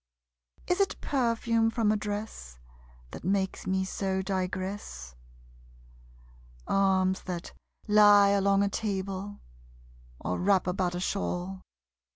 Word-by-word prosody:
Is 360 - 0
it 390 - 0
perfume 230 -3 +1
from 225 -2 +1
a - - +2
dress 205 - -5 0.5
That - - -9
makes 190 +1 -1
me 190 0 +1
so 190 0 -2
digress? 185 - -4 1.5
Arms 190 -1 +2
that 180 -2 -5 0.3
lie 205 -1 +7
along 200 0 +3
a 200 - +1
table, 200 -1 -4 0.8
or 90 - -3
wrap 190 0 +3
about 180 -1 -1
a - - -2
shawl. 185 0 -3
195 Hz, 110 wpm, -28 LUFS, 185-205 Hz, 1.5 s, lie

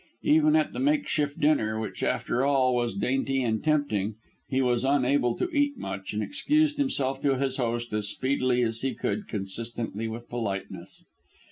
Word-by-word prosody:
Even 310 0 +4
at 310 -1 +2
the - - -4
makeshift 265 - 0
dinner, 110 -8 +2
which 110 - -5
after 125 - 0
all 135 -2 +3
was 120 -4 0
dainty 135 +5 0
and 110 -2 -1
tempting, 115 -10 +1 0.3
he 130 - +1
was 125 -2 +2
unable 135 -2 +2
to - - 0
eat 285 -1 +2
much, 95 - -5
and 105 0 -2
excused 295 +2 +1
himself 135 - 0
to 135 -2 +2
his 135 0 -1
host 120 -2 -2
as 105 -1 -1
speedily 130 0 +1
as 115 0 -2
he 135 -1 -1
could 210 - -2
consistently 115 +2 -3
with 115 +1 -7
politeness. 105 -5 -5
130 Hz, 165 wpm, -27 LUFS, 115-145 Hz, 0.3 s, Even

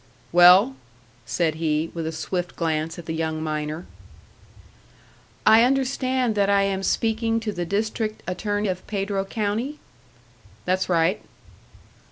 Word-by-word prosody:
"Well?" 175 -4 +7 0.5
said 165 -3 0
he, 155 0 0
with 165 -2 -4
a - - -2
swift 175 +2 -4
glance 160 -1 -2
at 170 - -9
the 160 - -4
young 160 -1 -2
miner. 155 +1 -3 1.6
"I 220 +1 +7
understand 260 -2 +1
that 200 -1 +1
I 200 0 +4
am 195 -1 -1
speaking 225 +2 0
to 220 -1 -3
the 175 -3 -4
District 215 +2 -2
Attorney 205 +3 -2
of 185 -1 -4
Pedro 195 -1 -2
County?" 220 +8 -2 0.9
"That's 185 +1 0
right." 170 +2 +2
190 Hz, 130 wpm, -24 LUFS, 165-215 Hz, 1.6 s, Well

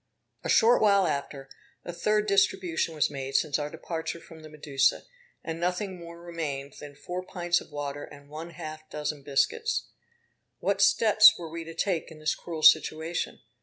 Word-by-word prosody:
A - - -4
short 235 +1 +5
while 200 -3 +5
after, 140 -3 -3 0.4
a 175 - -5
third 210 +4 +1
distribution 190 -5 +1
was 150 - +1
made 135 -1 -5
since 150 -2 +2
our 145 0 -3
departure 160 +1 -5
from 165 -1 -14
the 155 - -11
Medusa; 145 -2 +1 0.4
and 165 0 -5
nothing 180 +2 -2
more 170 0 -10
remained 150 -5 -5
than 145 -1 -10
four 180 +5 -5
pints 175 -1 0
of - - -14
water, 145 0 -5
and 145 -1 -15
one 155 +3 -8
half 155 -1 -9
dozen 150 -1 -4
biscuits. 450 - 0 0.7
What 200 0 0
steps 215 +1 +6
were 165 -2 -8
we 165 0 -5
to 165 0 -9
take 170 -1 -1
in 160 - -12
this 155 0 0
cruel 160 -3 -7
situation? 160 +2 +3
165 Hz, 170 wpm, -28 LUFS, 150-180 Hz, 0.7 s, steps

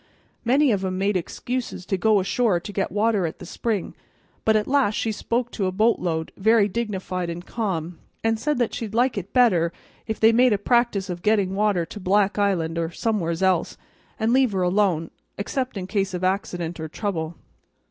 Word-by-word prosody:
Many 270 +3 +4
of 195 -3 0
'em 185 -1 -2
made 200 +1 +1
excuse 240 +3 -3
to 195 - 0
go 210 +2 +3
ashore 195 0 +1
to 205 +4 -8
get 195 - -1
water 210 -2 +1
at 160 - -7
the - - -10
spring; 220 -6 -2 0.5
but 220 - +3
at 210 -1 +2
last 265 -6 +2
she 225 - 0
spoke 235 +3 -2
to 195 -4 -1
a - - 0
bo't 220 +5 +2
load, 160 -2 -2
very 220 +1 +4
dignified 190 -5 -3
and 170 +1 -6
calm, 180 -7 -3 0.2
and 225 0 +1
said 300 +4 0
that 240 -2 0
she'd 220 -2 -5
like 245 +2 +2
it 200 -1 -5
better 185 -10 +4 0.4
if 220 - -3
they'd 225 +1 +6
make 245 0 +5
a - - +2
practice 220 -2 +1
of 175 -2 -5
getting 200 -2 +2
water 200 -4 +1
to 205 - -9
Black 200 +2 +2
Island 170 -5 +1
or 165 -1 -1
somewheres 175 -3 -1
else 190 -1 +1 0.4
and 225 +2 +2
leave 260 -4 +3
her 185 -1 +1
alone, 180 -3 +1 0.3
except 255 +3 -3
in 185 - -4
case 195 -1 -1
of 180 - -4
accident 180 -3 -1
or 160 - -4
trouble. 165 -2 -3
200 Hz, 200 wpm, -24 LUFS, 180-225 Hz, 0.5 s, they'd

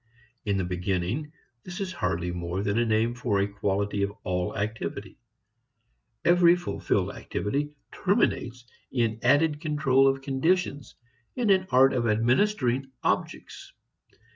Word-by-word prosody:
In 100 -2 0
the 95 - 0
beginning, 90 - -2 0.3
this 180 0 -8
is 190 -2 -3
hardly 85 +1 -2
more 90 +2 -3
than 100 +2 0
a 120 - +2
name 110 +2 +1
for 115 -4 -1
a 100 - +1
quality 100 0 -1
of 100 0 0
all 90 -1 -2
activity. 105 +2 -4 1.1
Every 175 0 +6
fulfilled 175 0 -1
activity 145 +8 -3 0.2
terminates 125 -1 0 0.3
in 115 -3 0
added 150 0 +3
control 150 -4 +3
of 135 0 0
conditions, 145 +1 0 0.4
in 235 -5 +2
an 185 -1 +3
art 130 +1 +5
of 120 -2 0
administering 130 - +1
objects. - - -3
125 Hz, 130 wpm, -27 LUFS, 100-150 Hz, 1.1 s, Every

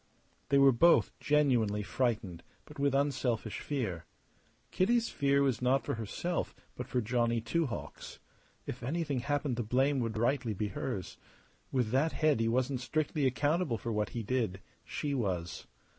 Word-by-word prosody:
They 140 - +4
were 140 0 +7
both 170 +8 +5
genuinely 120 -9 +2
frightened, 105 -7 -1 0.2
but 150 0 -12
with 140 -1 +2
unselfish 125 -6 0
fear. 110 - -3 0.7
Kitty's 230 +5 +2
fear 140 -1 +2
was 130 -4 +1
not 130 +2 +2
for - - -1
herself 115 - -3 0.2
but 125 - -6
for 125 - 0
Johnny 115 +1 +1
Two 145 +9 0
Hawks. 120 - -7 0.5
If - - -6
anything 145 +1 -1
happened 145 -1 -1
the - - 0
blame 130 +5 +1
would 115 -2 -2
rightly 120 -1 0
be 105 +2 -2
hers. 100 -2 -4 0.5
With 125 -5 0
that 140 +6 +2
head 155 -6 +2
he 115 - +1
wasn't 130 +3 0
strictly 150 +1 0
accountable 145 +1 +1
for 115 - -4
what 105 -1 0
he 115 - -4
did; 110 -5 -1 0.2
she 145 -1 -3
was. 90 -9 -2
125 Hz, 160 wpm, -32 LUFS, 115-145 Hz, 0.7 s, were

